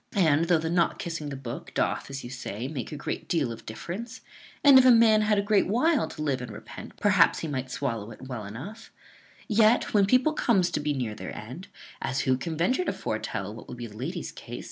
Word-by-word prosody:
And, 165 -4 +4
though 170 0 +4
the 160 +1 -3
not 170 -1 +2
kissing 165 -3 -4
the 140 - -5
book 125 -3 -8
doth, - - 0
as 135 0 -6
you 120 - -8
say, 125 -2 -5
make 135 -4 -5
a - - -5
great 145 - -5
deal 150 -8 +1
of 115 - -10
difference; 220 - -6 0.4
and, 280 -2 +9
if 260 - +5
a - - +8
man 225 -2 +6
had 210 0 +2
a 200 - +2
great 205 -1 +3
while 260 - +2
to 155 - -6
live 135 -4 0
and 125 - -6
repent, 105 - -10
perhaps - - +4
he 165 - -3
might 130 -3 -3
swallow 115 -6 -3
it 115 - -11
well 125 -4 -6
enough; 165 - -9 0.6
yet, 220 +1 +3
when 200 -2 +4
people 255 +8 +3
comes 195 - +2
to 155 - -1
be 150 0 -1
near 120 -5 -2
their - - -7
end 130 - -8 0.3
(as 135 - -1
who 130 -1 +2
can 160 +5 -4
venture 255 - +2
to - - -1
foretel - - -4
what - - -11
will - - -7
be 120 -1 -6
the 105 -2 -11
lady's 160 - -4
case?) 120 0 -8
155 Hz, 230 wpm, -27 LUFS, 130-210 Hz, 0.6 s, and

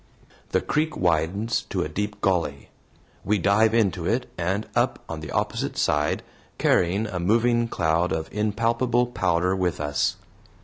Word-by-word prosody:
The - - +1
creek 155 +1 -1
widens 90 +6 +1
to - - -1
a - - -3
deep 105 +6 -4
gully. 85 -7 0 0.5
We 105 +1 +2
dive 105 +4 +3
into 95 -6 +1
it 125 +2 0
and 95 +5 -1
up - - +2
on 80 - -5
the 80 -2 -8
opposite - - -2
side, 75 0 +1 0.3
carrying 90 +5 +2
a 95 -5 -4
moving 115 +5 +2
cloud 85 -3 +1
of 80 0 -2
impalpable 115 +3 +1
powder 90 -5 0
with 90 -3 -1
us. 75 -1 0
95 Hz, 145 wpm, -25 LUFS, 85-110 Hz, 0.5 s, dive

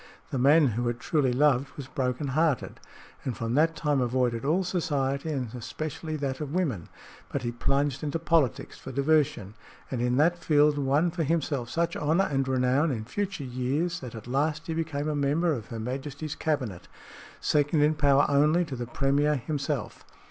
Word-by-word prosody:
The 135 - -1
man 145 +2 +5
who 120 +2 -1
had 120 0 -2
truly 140 -1 +1
loved 135 0 +2
was 140 - -6
broken 130 +1 -2
hearted, 150 -1 0 0.4
and 125 -5 -3
from 115 0 -2
that 160 +4 +3
time 145 -3 +1
avoided 125 -2 0
all 165 +7 +2
society 145 -5 -1
and 130 -6 -3
especially 155 +6 -5
that 140 -2 -3
of 150 +2 -4
women. 135 - -1 0.4
But - - -2
he 120 - -1
plunged 135 +3 0
into 150 0 -2
politics 165 -6 0
for - - -8
diversion, 140 -7 +1 0.4
and 125 -3 -2
in 125 +1 +1
that 170 +4 +3
field 150 -2 +3
won 145 +5 +2
for 175 0 -3
himself 145 -6 -1
such 170 +5 -1
honor 160 +6 +2
and 135 -1 0
renown 130 +4 +2
in 110 -6 -3
future 195 - -3
years 135 +7 -1
that 125 -3 -8
at 110 - -8
last 150 +5 -1
he 165 - -3
became 160 -2 -2
a 155 - -1
member 150 +4 +1
of 115 -6 -5
Her 115 - -6
Majesty's 140 +5 -4
cabinet, 130 - -2 0.5
second 145 +1 +2
in 150 +1 +4
power 145 -2 +4
only 150 +5 +3
to 145 -5 -6
the 120 -1 -5
Premier 140 +4 +1
himself. 140 -1 -3
140 Hz, 180 wpm, -27 LUFS, 125-155 Hz, 0.5 s, man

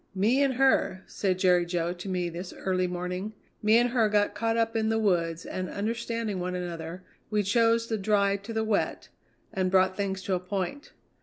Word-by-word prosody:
'Me 225 +8 +3
and 275 -2 +2
her,' 255 -7 +2
said 190 -3 -1
Jerry 180 -2 +4
Jo 175 0 -1
to 180 +2 -8
me 180 -2 -1
this 175 +2 -6
early 185 -1 -1
morning, 180 +3 -4 0.3
'me 215 +2 +5
and 240 0 +3
her 230 -4 +3
got 205 -1 +2
caught 225 +2 0
up 225 0 +1
in 220 -1 +1
the 225 - +1
woods, 170 -6 0
and, 185 0 -4
understanding 230 -1 -2
one 180 0 -3
another, 175 0 -5 0.3
we 210 -1 +1
chose 230 +3 +3
the 225 -2 -2
dry 200 0 +2
to 200 +3 -9
the 220 -1 0
wet, 215 -2 -1 0.4
and 185 -1 0
brought 185 0 +3
things 195 -1 -2
to 190 - -1
a 180 - +1
point. 190 - -4
195 Hz, 200 wpm, -28 LUFS, 180-225 Hz, 0.4 s, me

